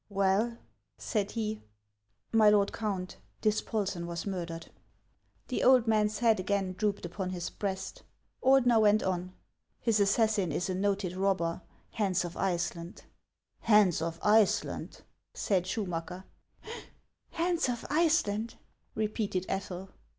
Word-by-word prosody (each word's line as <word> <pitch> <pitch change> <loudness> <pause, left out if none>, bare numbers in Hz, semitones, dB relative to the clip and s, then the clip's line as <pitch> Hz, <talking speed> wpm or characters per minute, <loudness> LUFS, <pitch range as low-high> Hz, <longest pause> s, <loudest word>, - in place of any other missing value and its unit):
" - - -46
Well? 200 +4 +1 0.2
" 100 -1 -50
said 205 -2 -1
he. 215 -2 -3 0.4
" - - -54 0.3
My 220 -2 +6
lord 205 -1 +3
Count, 195 -5 -3 0.2
Dispolsen 205 -4 -1
was 170 -1 -5
murdered." 170 -4 -5 0.8
The 255 - -1
old 255 -2 +6
man's 215 -2 +2
head 225 -2 +3
again 190 0 -1
drooped 205 0 -1
upon 185 +2 -4
his 180 -2 -4
breast. 190 -2 -4 0.4
Ordener 250 -3 +5
went 215 0 +4
on: 185 0 -2 0.2
" - - -53
His 225 -3 +1
assassin 200 -2 +2
is 180 +5 -1
a - - -1
noted 195 -1 -1
robber, 185 -3 0
— - - -34
Hans 190 -3 +1
of 175 - -7
Iceland." 175 -1 -3 0.3
" - - -53
Hans 205 -7 +5
of 165 0 -3
Iceland! 210 -1 +2 0.2
" - - -53
said 185 -3 +2
Schumacker. 180 -2 -4 0.6
" - - -26
Hans 340 -4 0
of 240 -2 -3
Iceland! 300 -9 +1 0.2
" - - -43
repeated 210 -3 -1
Ethel. 190 -1 -4
200 Hz, 145 wpm, -30 LUFS, 185-220 Hz, 0.8 s, My